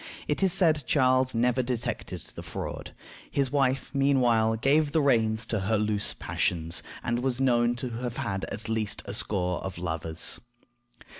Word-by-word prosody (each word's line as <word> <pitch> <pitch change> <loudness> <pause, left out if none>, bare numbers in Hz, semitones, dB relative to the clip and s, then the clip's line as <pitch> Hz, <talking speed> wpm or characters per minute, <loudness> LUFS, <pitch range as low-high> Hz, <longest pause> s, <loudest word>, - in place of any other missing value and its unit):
It - - 0
is 190 -2 +4
said 160 -5 +4
Charles 130 -2 +3
never 125 +2 +2
detected 125 -2 -3
the - - -7
fraud. - - -6 0.4
His 135 -2 0
wife, 135 -2 +1
meanwhile, 125 -5 +3
gave 145 +5 +2
the 160 - +4
reins 115 -4 +2
to 110 -1 -1
her 105 +3 +1
loose 105 -1 0
passions, 85 -1 -1 0.2
and 120 0 0
was 125 0 -1
known 120 -2 +3
to 125 +1 -4
have 120 -1 -4
had 105 -8 -2
at 105 - -6
least 110 -2 -1
a - - -5
score 90 -4 0
of 95 -1 -6
lovers. 80 -1 -2
120 Hz, 160 wpm, -27 LUFS, 105-135 Hz, 0.4 s, is